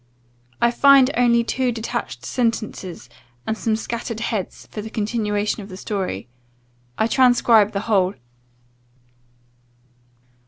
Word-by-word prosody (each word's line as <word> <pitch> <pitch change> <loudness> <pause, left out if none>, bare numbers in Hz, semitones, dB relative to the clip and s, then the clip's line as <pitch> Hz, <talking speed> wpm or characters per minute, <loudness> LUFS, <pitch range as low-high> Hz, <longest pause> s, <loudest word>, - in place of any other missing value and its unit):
I 235 - +3
find 275 +1 +6
only 235 -1 +3
two 255 +1 0
detached 225 -1 -5
sentences, 220 - -3 0.4
and 220 - -1
some 220 0 0
scattered 230 0 -4
heads 220 -5 -4
for 210 - -5
the 220 - -7
continuation 210 -1 -1
of 200 - -10
the 185 - -9
story. 190 - -4 0.7
I - - +2
transcribe 235 -4 +4
the 200 - -1
whole. 195 -4 +1
220 Hz, 115 wpm, -21 LUFS, 205-235 Hz, 0.7 s, find